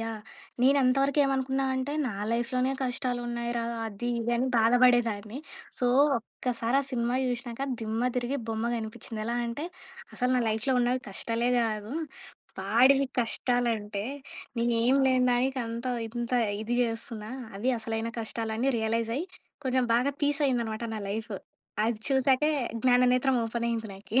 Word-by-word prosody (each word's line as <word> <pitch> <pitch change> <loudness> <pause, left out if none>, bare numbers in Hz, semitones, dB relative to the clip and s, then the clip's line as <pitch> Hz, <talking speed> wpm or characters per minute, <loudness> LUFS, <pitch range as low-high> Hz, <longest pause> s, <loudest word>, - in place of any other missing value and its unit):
Yeah! 225 -1 -4 0.4
నేను 275 +2 +5
అంతవరకు 275 +3 +2
ఏమనుకున్నానంటే, 265 0 0
నా 235 - -2 0.2
లైఫ్‌లోనె 255 +2 0
కష్టాలు 250 -1 -1
ఉన్నాయిరా, 235 0 -2 0.2
అది 220 +3 -4
ఇది 235 +1 -1
అని 255 - +1
బాధబడేదాన్ని. 230 -1 +3 0.4
సో, 250 - +1 0.3
ఒక్కసారి 235 +1 -2
ఆ - - -3
సినిమా 240 -1 0
చూశినాక 245 +1 -3 0.2
దిమ్మ 225 +2 0
తిరిగి 250 +3 0
బొమ్మ 220 0 -1
కనిపించింది. 225 +1 -6
ఎలా 235 +1 -1
అంటే, 235 +6 -4 0.5
అసలు 250 0 0
నా - - +3
లైఫ్‌లో 225 +5 0
ఉన్నవి 245 +1 +1
కష్టాలే 230 +4 -1
గాదు. 215 -1 -1 0.7
వాడివి 255 +8 +5
కష్టాలంటే. 230 -4 0 0.5
నేనేం 235 +2 +3
లేని 255 -1 +3
దానికి 255 +2 +1
అంత 230 +2 -5 0.2
ఇంత 240 +1 -4 0.3
ఇది 240 +2 -1
జెస్తున్నా. 225 -2 -4 0.3
అవి 235 +6 +1
అసలైన 225 +1 -2
కష్టాలు 220 0 -3
అని 250 +4 +1
రియలైజ్ 225 +1 0
అయ్యి, 325 +6 -2 0.4
కొంచెం 255 -1 +2
బాగా 255 +4 +2
పీస్ 285 +1 +2
అయిందనమాట 235 -3 -1
నా 215 - -4
లైఫ్. 220 +1 -4 0.5
అది 230 -2 -1
చూసాకే, 270 +2 +3 0.3
జ్ఞాననేత్రం 250 +1 +4
ఓపెన్ 235 +1 -2
అయ్యింది 225 -1 -2
నాకీ. 200 +6 0
240 Hz, 140 wpm, -28 LUFS, 225-255 Hz, 0.7 s, నేను